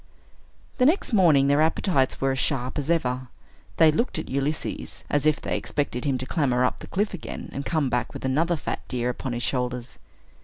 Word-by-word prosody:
The 250 - +5
next 320 - +1
morning, 165 -9 +5
their 145 +2 +4
appetites 160 -3 +1
were 135 0 +1
as 130 - -2
sharp 130 +1 -1
as 145 - -4
ever. 130 -6 0 0.5
They 160 -2 +7
looked 235 +8 -1
at 160 - -5
Ulysses, 140 +3 -3
as 145 +1 +2
if 155 -1 +3
they - - -2
expected 140 -3 -2
him 135 -2 +1
to 130 - -4
clamber 130 -5 +1
up - - -1
the - - -9
cliff 205 +2 -1
again, 180 - -7
and 140 +1 -4
come 155 -4 +1
back 125 -1 -1
with - - -7
another 160 +6 +2
fat 155 - -4
deer 125 -1 -1
upon 125 +1 -5
his 120 +1 -2
shoulders. 125 -2 -2
140 Hz, 200 wpm, -25 LUFS, 125-160 Hz, 0.5 s, They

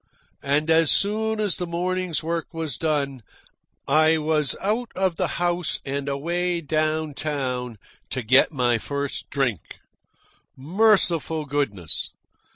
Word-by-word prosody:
And 150 +3 +1
as 160 -1 +5
soon 220 +2 +1
as 205 -4 0
the 180 - -3
morning's 180 -2 -2
work 165 +1 -3
was 160 -5 -3
done, 140 -5 -1 0.7
I 155 +3 +4
was 150 -3 +1
out 220 +4 -1
of 185 -2 +1
the - - 0
house 175 0 0
and 140 +1 -3
away 170 +5 -1
down 155 0 -1
town 130 -5 -3 0.3
to 130 - -3
get 130 +7 +5
my 120 -5 +1
first 140 +3 -4
drink. 120 - 0 1.0
Merciful 170 -1 +2
goodness! 130 - 0
155 Hz, 125 wpm, -24 LUFS, 140-175 Hz, 1.0 s, as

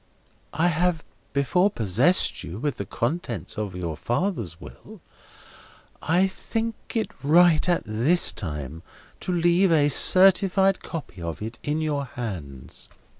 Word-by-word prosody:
I 165 +4 +2
have 170 -1 0 0.3
before 180 +8 +2
possessed 120 - +1
you 85 - -7
with 145 +4 -3
the 100 - -6
contents 120 - -4
of 105 -4 -5
your 85 -3 -4
father's 120 - -3
will, - - -13 1.0
I 175 +5 +2
think 225 +4 -3 0.2
it 225 - -1
right 165 +2 +4
at 175 - +1
this 125 +12 +2
time 75 - -7 0.4
to - - -4
leave 175 +2 +2
a 145 -3 +3
certified 190 +4 +5
copy 145 - -8
of 85 -1 -5
it 110 +1 -7
in 150 +2 -2
your 145 -3 -2
hands. 80 - -8
145 Hz, 130 wpm, -24 LUFS, -, 1.0 s, certified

